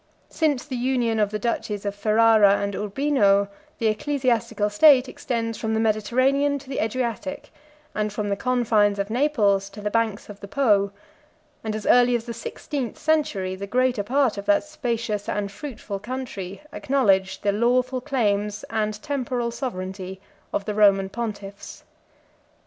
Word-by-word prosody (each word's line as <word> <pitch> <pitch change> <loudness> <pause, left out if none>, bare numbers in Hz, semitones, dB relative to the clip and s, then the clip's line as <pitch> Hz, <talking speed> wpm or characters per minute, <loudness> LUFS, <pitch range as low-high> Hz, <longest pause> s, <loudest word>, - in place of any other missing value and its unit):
88 - - -18
Since 300 -5 +1
the 270 -4 -5
union 240 -3 0
of 210 -1 +2
the 210 - -3
duchies 210 -3 -3
of 200 - -1
Ferrara 215 -1 +5
and 200 0 -2
Urbino, 205 -3 +2 0.3
the 230 - -3
ecclesiastical 235 -2 0
state 270 +3 +6
extends 230 -3 -3
from 220 -1 -1
the - - +1
Mediterranean 255 +6 +2
to 275 -1 -13
the 265 - -3
Adriatic, 245 +4 -3 0.4
and 215 0 -1
from 210 0 -3
the 200 - +1
confines 220 -3 +2
of 200 +1 -3
Naples 215 -7 +2
to 200 +2 -11
the 210 0 -3
banks 225 -2 0
of 205 -1 -10
the 200 - -9
Po; 205 -5 +2 0.7
and 215 -1 -3
as 215 - -5
early 245 0 +5
as 230 -1 -2
the 235 - -5
sixteenth 240 +2 -5
century, 285 -13 0
the 195 +1 -6
greater 250 0 +1
part 250 0 +1
of 200 - -7
that 205 -1 +4
spacious 235 -9 -3
and 205 -1 -2
fruitful 205 -3 -6
country 210 -3 -6
acknowledged 200 -10 +1
the 205 - +3
lawful 250 +4 +1
claims 210 -6 -1
and 215 -1 -1
temporal 250 -4 -2
sovereignty 190 -6 -5 0.3
of 200 - -2
the 210 - -2
Roman 200 -2 +4
pontiffs. 205 -3 -6
220 Hz, 160 wpm, -24 LUFS, 205-255 Hz, 0.7 s, state